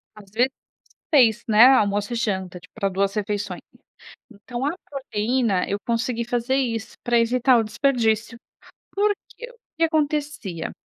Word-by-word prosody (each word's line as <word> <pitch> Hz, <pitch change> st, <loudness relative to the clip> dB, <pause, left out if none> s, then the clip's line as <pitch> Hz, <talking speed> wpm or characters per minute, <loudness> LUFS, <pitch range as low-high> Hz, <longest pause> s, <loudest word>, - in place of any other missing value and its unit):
Às 205 Hz, -2 st, -15 dB
vezes 245 Hz, +5 st, +2 dB, 0.6 s
6, 235 Hz, -5 st, +5 dB
né, 220 Hz, +3 st, +8 dB
almoço 205 Hz, -4 st, +3 dB
e -, -, -1 dB
janta, 190 Hz, -6 st, -2 dB
tipo 180 Hz, -, -19 dB
para 200 Hz, -3 st, -1 dB
2 195 Hz, +1 st, 0 dB
refeições. 205 Hz, -3 st, -3 dB, 0.7 s
Então, 240 Hz, +5 st, -6 dB
a 310 Hz, -, -1 dB, 0.2 s
proteína 235 Hz, -6 st, -1 dB
eu 200 Hz, -, -1 dB
consegui 235 Hz, 0 st, -1 dB
fazer 245 Hz, +2 st, -1 dB
isso, 230 Hz, -4 st, -2 dB
pra 240 Hz, -1 st, +3 dB
evitar 245 Hz, +2 st, +3 dB
o 225 Hz, -, +1 dB
desperdício. 230 Hz, -1 st, 0 dB, 0.6 s
Por 410 Hz, +1 st, +3 dB, 0.2 s
que, 485 Hz, +1 st, -9 dB
o -, -, -22 dB, 0.2 s
que 330 Hz, -, +1 dB
acontecia, 295 Hz, -, -2 dB
230 Hz, 150 wpm, -23 LUFS, 205-260 Hz, 0.7 s, né